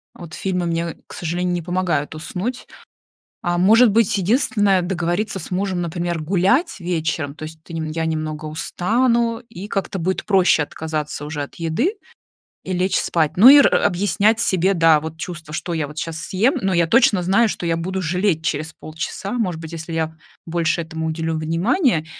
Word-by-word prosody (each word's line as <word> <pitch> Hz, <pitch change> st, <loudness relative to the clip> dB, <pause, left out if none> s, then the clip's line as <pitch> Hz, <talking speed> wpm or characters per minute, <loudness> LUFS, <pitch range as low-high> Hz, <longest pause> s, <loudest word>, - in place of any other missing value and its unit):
вот 170 Hz, -3 st, -11 dB
фильмы 180 Hz, -1 st, -2 dB
мне, 170 Hz, 0 st, -2 dB
к -, -, -12 dB
сожалению, 175 Hz, +1 st, -2 dB
не 175 Hz, -, -1 dB
помогают 170 Hz, -4 st, -1 dB
уснуть. 195 Hz, +10 st, -5 dB, 0.8 s
А, 175 Hz, -1 st, 0 dB
может 220 Hz, +6 st, +6 dB
быть 220 Hz, -1 st, +2 dB
единственное, 205 Hz, -2 st, +2 dB
договориться 175 Hz, +3 st, -1 dB
с 170 Hz, -, -8 dB
мужем, 185 Hz, 0 st, -1 dB
например, 170 Hz, 0 st, -2 dB
гулять 195 Hz, -, +1 dB
вечером, 160 Hz, -4 st, -2 dB
то 155 Hz, -, -9 dB
есть 160 Hz, 0 st, -10 dB
ты 170 Hz, -, -13 dB
я 160 Hz, +1 st, -3 dB
немного 155 Hz, -1 st, -3 dB
устану, 230 Hz, +9 st, 0 dB
и 190 Hz, +4 st, -8 dB
как-то 195 Hz, -1 st, -3 dB
будет 185 Hz, +2 st, -2 dB
проще 185 Hz, -6 st, +4 dB
отказаться 155 Hz, -1 st, -4 dB
уже 150 Hz, 0 st, -4 dB
от 140 Hz, -, -8 dB
еды 170 Hz, -, -1 dB, 0.7 s
и 185 Hz, -, -4 dB
лечь 185 Hz, +1 st, +1 dB
спать. 160 Hz, -3 st, +1 dB
Ну, 215 Hz, +8 st, +9 dB
и 285 Hz, +2 st, +10 dB
р 285 Hz, -, +5 dB
объяснять 205 Hz, +4 st, +2 dB
себе, 190 Hz, -2 st, +2 dB
да, 165 Hz, -3 st, +5 dB
вот 160 Hz, +1 st, -7 dB
чувство, 165 Hz, -3 st, -7 dB
что 175 Hz, -, -3 dB
я 155 Hz, -3 st, -1 dB
вот 150 Hz, +1 st, -12 dB
сейчас 160 Hz, 0 st, -4 dB
съем. 205 Hz, -, +1 dB
Но 190 Hz, -3 st, 0 dB
я 170 Hz, -1 st, +3 dB
точно 205 Hz, -1 st, +4 dB
знаю, 195 Hz, +6 st, +3 dB
что 185 Hz, -, -4 dB
я 165 Hz, 0 st, +1 dB
буду 185 Hz, +3 st, -3 dB
жалеть 180 Hz, -1 st, 0 dB
через 155 Hz, +1 st, -2 dB
полчаса, 160 Hz, +5 st, -6 dB
может 190 Hz, -9 st, -2 dB
быть, 160 Hz, 0 st, -8 dB
если 165 Hz, 0 st, -6 dB
я 160 Hz, 0 st, -2 dB, 0.3 s
больше 170 Hz, 0 st, 0 dB
этому 160 Hz, 0 st, -5 dB
уделю 160 Hz, 0 st, -2 dB
внимания, 165 Hz, -, +1 dB
175 Hz, 180 wpm, -21 LUFS, 160-195 Hz, 0.8 s, и